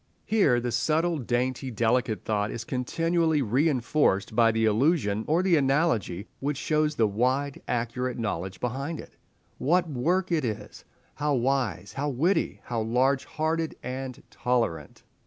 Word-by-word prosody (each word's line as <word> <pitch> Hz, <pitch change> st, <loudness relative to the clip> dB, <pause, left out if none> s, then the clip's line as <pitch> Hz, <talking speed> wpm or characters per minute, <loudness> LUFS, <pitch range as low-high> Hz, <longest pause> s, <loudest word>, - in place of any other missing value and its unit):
Here 190 Hz, -, +3 dB
the 120 Hz, 0 st, -2 dB
subtle, 155 Hz, +7 st, +1 dB
dainty, 130 Hz, +2 st, -1 dB
delicate 115 Hz, -3 st, 0 dB
thought 105 Hz, -1 st, 0 dB
is 115 Hz, -, -5 dB
continually 160 Hz, +5 st, 0 dB
reinforced 125 Hz, -4 st, +1 dB
by 115 Hz, -1 st, +5 dB
the 115 Hz, 0 st, +1 dB
allusion 110 Hz, -, +2 dB
or 165 Hz, +4 st, +2 dB
the 185 Hz, -3 st, +4 dB
analogy 135 Hz, -, +1 dB
which 140 Hz, 0 st, -2 dB
shows 155 Hz, +1 st, +1 dB
the 115 Hz, -, +3 dB
wide, 130 Hz, +7 st, 0 dB
accurate 125 Hz, +1 st, -2 dB
knowledge 95 Hz, -5 st, -3 dB
behind 135 Hz, +6 st, -3 dB
it. -, -, -11 dB, 0.4 s
What 175 Hz, +5 st, +2 dB
work 170 Hz, +7 st, 0 dB
it 160 Hz, -4 st, +2 dB
is! 110 Hz, -4 st, -5 dB, 0.3 s
how 150 Hz, -1 st, 0 dB
wise, 120 Hz, -7 st, -1 dB
how 145 Hz, +2 st, -2 dB
witty, 160 Hz, +9 st, 0 dB
how 120 Hz, -2 st, -2 dB
large 130 Hz, +4 st, +1 dB
hearted 160 Hz, +1 st, -2 dB
and 130 Hz, 0 st, -5 dB
tolerant! 115 Hz, -, -1 dB
130 Hz, 140 wpm, -27 LUFS, 115-155 Hz, 0.4 s, by